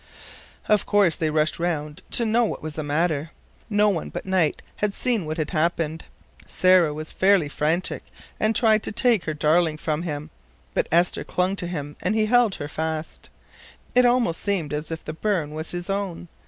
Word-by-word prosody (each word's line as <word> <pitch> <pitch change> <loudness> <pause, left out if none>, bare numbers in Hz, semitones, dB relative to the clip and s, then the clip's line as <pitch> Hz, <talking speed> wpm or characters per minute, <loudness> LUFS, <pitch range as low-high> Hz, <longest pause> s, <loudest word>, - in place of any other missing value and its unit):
Of 210 -1 +2
course 200 -6 +4
they 160 - -1
rushed 155 +1 +1
around 155 -2 -2
her - - -15
to 235 - +3
know 230 +2 +3
what 220 - -3
was 155 -1 -4
the 155 - -4
matter. 155 +1 0 0.4
No 210 0 +3
one 180 -5 -2
but - - -6
Knight 185 -5 +1
had 205 -1 -1
seen 230 -10 +1
what 155 +2 -3
had 155 -2 -2
happened. 165 -1 -1 0.4
Sarah 185 -4 +4
was 155 +1 -6
fairly 190 -5 +3
frantic, 155 +4 -1 0.4
and 220 +1 +1
tried 220 -1 +4
to - - -3
take 230 -3 +2
her 155 - -2
darling 155 +1 +2
from 155 0 -2
him, 150 -4 -5 0.4
but - - 0
Esther 175 +2 +2
clung 185 +2 0
to 175 - -3
him 150 -4 -5
and 195 +4 0
he 215 -1 +3
held 240 -2 +3
her 145 - -5
fast. 160 +1 -4 0.6
It 250 0 +5
almost 240 -9 +1
seemed 185 -8 -1
as 150 +1 -2
if 165 0 -6
the 155 - -4
burn 165 -4 -1
was 155 +1 -5
his 175 0 -5
own. 195 -4 -3
170 Hz, 195 wpm, -24 LUFS, 155-200 Hz, 0.6 s, It